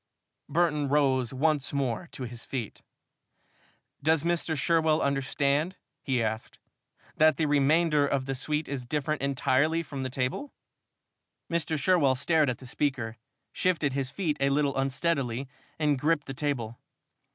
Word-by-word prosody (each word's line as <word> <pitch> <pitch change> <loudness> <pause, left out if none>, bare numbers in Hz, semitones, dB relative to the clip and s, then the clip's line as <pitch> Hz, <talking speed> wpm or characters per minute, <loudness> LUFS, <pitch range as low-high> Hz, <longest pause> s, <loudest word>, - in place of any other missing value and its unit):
Burton 150 -2 +1
rose 135 -4 +2
once 145 +1 +1
more 140 +4 -2
to 130 - -6
his 120 -1 -6
feet. 120 -6 -5 1.2
"Does 160 +1 +3
Mr. 170 -2 0
Sherwell 160 0 +2
understand," 140 +4 0 0.3
he 130 -3 0
asked, 110 0 -4 0.6
"that 155 -2 +5
the 160 - +1
remainder 150 +1 +3
of 140 -2 0
the 135 - -2
suite 150 +4 -1
is 135 -3 -4
different 150 +4 -2
entirely 140 +4 +1
from 140 -3 -6
the 130 - -2
table?" 130 - -2 1.0
Mr. 165 -1 0
Sherwell 145 -4 +3
stared 155 +2 +2
at 125 - -2
the 130 - -13
speaker, 125 -4 -2 0.4
shifted 160 -7 +1
his 135 -1 -1
feet 155 -1 -2
a 140 0 +2
little 140 0 +1
unsteadily 135 -2 -1 0.3
and 150 -3 +1
gripped 150 +1 +1
the 135 - -6
table. 130 -5 -3
140 Hz, 140 wpm, -28 LUFS, 130-155 Hz, 1.2 s, that